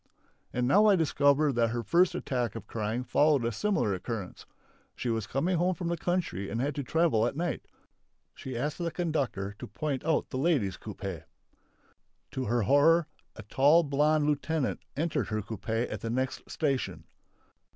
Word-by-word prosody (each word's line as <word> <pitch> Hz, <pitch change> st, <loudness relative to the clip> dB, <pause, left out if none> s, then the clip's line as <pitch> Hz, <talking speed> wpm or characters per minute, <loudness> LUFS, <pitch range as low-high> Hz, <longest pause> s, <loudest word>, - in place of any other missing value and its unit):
And 125 Hz, 0 st, 0 dB
now 205 Hz, +10 st, +5 dB
I 205 Hz, -, +6 dB
discover 145 Hz, -3 st, +3 dB
that 120 Hz, -1 st, +2 dB
her 120 Hz, +1 st, -2 dB
first 180 Hz, +4 st, +3 dB
attack 125 Hz, -, -2 dB
of -, -, -7 dB
crying 110 Hz, +2 st, -3 dB
followed 140 Hz, +1 st, +3 dB
a 115 Hz, -, 0 dB
similar 120 Hz, -, 0 dB
occurrence. 95 Hz, 0 st, -6 dB, 0.5 s
She 125 Hz, -, -3 dB
was 110 Hz, -2 st, -1 dB
coming 170 Hz, +7 st, 0 dB
home 180 Hz, +2 st, +1 dB
from 170 Hz, +1 st, -3 dB
the 170 Hz, -, 0 dB
country 170 Hz, -, -2 dB
and 115 Hz, -, -3 dB
had 140 Hz, +4 st, 0 dB
to 140 Hz, -, -3 dB
travel 135 Hz, -5 st, +2 dB
at 120 Hz, -, -4 dB
night. 170 Hz, +2 st, -2 dB, 0.7 s
She 130 Hz, -2 st, -6 dB
asked 145 Hz, +6 st, -2 dB
the 170 Hz, -1 st, -1 dB
conductor 140 Hz, -, -2 dB
to -, -, -7 dB
point 140 Hz, +5 st, -3 dB
out 160 Hz, -1 st, 0 dB
the 130 Hz, -, -2 dB
ladies' 135 Hz, -, +1 dB
coupé. 95 Hz, -6 st, -6 dB, 1.1 s
To 130 Hz, -, -3 dB
her 120 Hz, +1 st, +1 dB
horror 150 Hz, -, +5 dB, 0.3 s
a 110 Hz, -, -9 dB
tall, 145 Hz, -, +4 dB
blonde 150 Hz, +1 st, +2 dB
lieutenant 150 Hz, 0 st, 0 dB, 0.2 s
entered 150 Hz, -, 0 dB
her 110 Hz, -1 st, -2 dB
coupé 110 Hz, +3 st, -3 dB
at -, -, -6 dB
the 115 Hz, -, -3 dB
next 130 Hz, +2 st, -2 dB
station. 130 Hz, -, -1 dB
135 Hz, 170 wpm, -29 LUFS, 115-160 Hz, 1.1 s, I